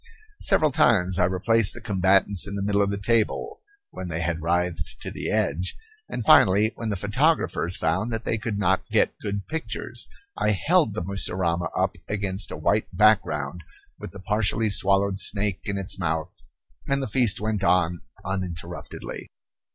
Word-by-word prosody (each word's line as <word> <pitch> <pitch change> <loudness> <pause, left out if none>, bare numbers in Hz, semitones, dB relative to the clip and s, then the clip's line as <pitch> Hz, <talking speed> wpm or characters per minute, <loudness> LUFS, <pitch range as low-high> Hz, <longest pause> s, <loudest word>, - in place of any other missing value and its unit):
Several 155 -2 +3
times 100 - +3
I - - +4
replaced 100 +4 +2
the - - -7
combatants 100 -2 +2
in 100 - -5
the 100 - -2
middle 100 0 +1
of 100 - +2
the 100 - -2
table 115 - 0 0.3
when 95 - -7
they 85 -1 -3
had 85 0 -2
writhed 85 +1 -1
to - - -5
the - - -4
edge, 85 +6 0 0.3
and 120 - -4
finally, 105 +3 +6
when 115 - -5
the 105 - -1
photographers 105 - +1
found 95 +9 0
that 115 0 -3
they 115 - -1
could 110 -3 -3
not 95 -2 0
get - - +2
good 100 -1 -4
pictures, 160 0 -5 0.3
I 105 - +1
held 150 - +2
the 90 - -2
mussurama 90 -3 -1
up 95 +1 0
against 100 -1 -2
a - - -6
white 105 +7 +1
background 90 -6 +2 0.4
with - - -8
the 100 - -11
partially 105 +2 +1
swallowed 100 0 +2
snake 100 -2 0
in 100 -1 -2
its 95 0 -5
mouth; 80 0 -2 0.5
and 140 0 +1
the - - -2
feast 120 -2 +3
went 105 -1 -2
on 90 -3 +2 0.2
uninterruptedly. 90 -2 -6
100 Hz, 165 wpm, -25 LUFS, 90-110 Hz, 0.5 s, finally